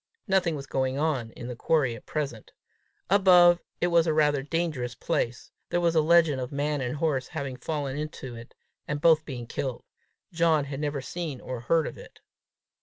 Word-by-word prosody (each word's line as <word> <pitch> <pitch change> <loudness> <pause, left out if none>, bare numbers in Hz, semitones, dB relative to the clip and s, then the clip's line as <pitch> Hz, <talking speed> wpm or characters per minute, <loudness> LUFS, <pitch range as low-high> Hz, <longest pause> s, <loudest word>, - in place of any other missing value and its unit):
Nothing 190 -4 +2
was 140 -2 -6
going 130 0 -1
on 140 -6 0
in 120 - -8
the 125 - -5
quarry 135 -2 +1
at 115 - -14
present. 140 -8 -4 0.6
Above, 180 -3 +6 0.2
it - - +1
was 170 -1 +4
rather 150 -2 +3
a - - -6
dangerous 150 -6 -2
place; 120 0 -2 0.2
there 175 - +1
was 170 -1 +2
a 160 - +4
legend 160 -4 +4
of 125 - -5
man 145 0 -1
and 125 +2 -2
horse 145 -4 0
having 140 -5 -5
fallen 140 0 -3
into 150 -4 -6
it, 115 0 -11 0.3
and 145 0 -2
both 160 0 +4
being 125 -4 -6
killed. 125 +1 -4 0.5
John 160 -3 +3
had 140 -1 -6
never 145 -2 -2
seen 155 -2 -5
or 130 -1 -6
heard 160 +7 +2
of - - -7
it. - - -14
145 Hz, 185 wpm, -27 LUFS, 130-165 Hz, 0.6 s, Above